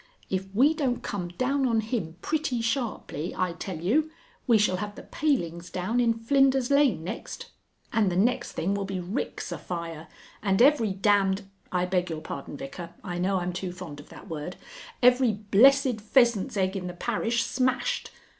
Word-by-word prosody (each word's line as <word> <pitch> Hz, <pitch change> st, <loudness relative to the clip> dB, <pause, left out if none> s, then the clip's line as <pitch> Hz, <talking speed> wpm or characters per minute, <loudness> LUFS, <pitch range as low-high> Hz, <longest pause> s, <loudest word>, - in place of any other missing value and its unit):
If 190 Hz, 0 st, -1 dB
we 280 Hz, +8 st, +5 dB
don't 270 Hz, -6 st, -1 dB
come 190 Hz, -4 st, -3 dB
down 260 Hz, +9 st, 0 dB
on 230 Hz, -2 st, +2 dB
him 215 Hz, -7 st, -3 dB
pretty 305 Hz, -6 st, 0 dB
sharply, 230 Hz, -, -2 dB
I 180 Hz, -2 st, 0 dB
tell 180 Hz, +1 st, -5 dB
you, 275 Hz, -, +2 dB, 0.4 s
we 235 Hz, -3 st, +6 dB
shall 200 Hz, -3 st, +2 dB
have 205 Hz, +2 st, -5 dB
the -, -, -10 dB
palings 175 Hz, -, -1 dB
down 195 Hz, +7 st, -1 dB
in 230 Hz, -2 st, +3 dB
Flinders 265 Hz, +2 st, +3 dB
Lane 280 Hz, -, +3 dB
next, 180 Hz, -, -6 dB, 0.4 s
and 210 Hz, -4 st, +3 dB
the -, -, -2 dB
next 220 Hz, +7 st, +1 dB
thing 190 Hz, +4 st, -1 dB
will 200 Hz, 0 st, -1 dB
be 190 Hz, -1 st, -3 dB
ricks 185 Hz, +8 st, -4 dB
afire, 165 Hz, -2 st, -5 dB, 0.3 s
and 195 Hz, -2 st, +1 dB
every 255 Hz, -4 st, +5 dB
damned 195 Hz, 0 st, +2 dB, 0.3 s
(I 180 Hz, -1 st, +1 dB
beg 180 Hz, -1 st, 0 dB
your 160 Hz, -1 st, -4 dB
pardon, 140 Hz, -2 st, -7 dB
Vicar. 165 Hz, +6 st, -8 dB
I 175 Hz, -2 st, -4 dB
know 190 Hz, +2 st, +1 dB
I'm 180 Hz, 0 st, -2 dB
too 180 Hz, 0 st, -4 dB
fond 175 Hz, -5 st, -8 dB
of 145 Hz, -, -13 dB
that -, -, -12 dB
word), 160 Hz, +2 st, -5 dB, 0.5 s
every 250 Hz, -2 st, +5 dB
blessed 225 Hz, +4 st, +4 dB
pheasant's 235 Hz, 0 st, +3 dB
egg 190 Hz, 0 st, +1 dB
in 185 Hz, -2 st, -3 dB
the 180 Hz, -, -5 dB
parish 230 Hz, +4 st, 0 dB
smashed. 260 Hz, -, 0 dB
205 Hz, 175 wpm, -27 LUFS, 180-245 Hz, 0.5 s, we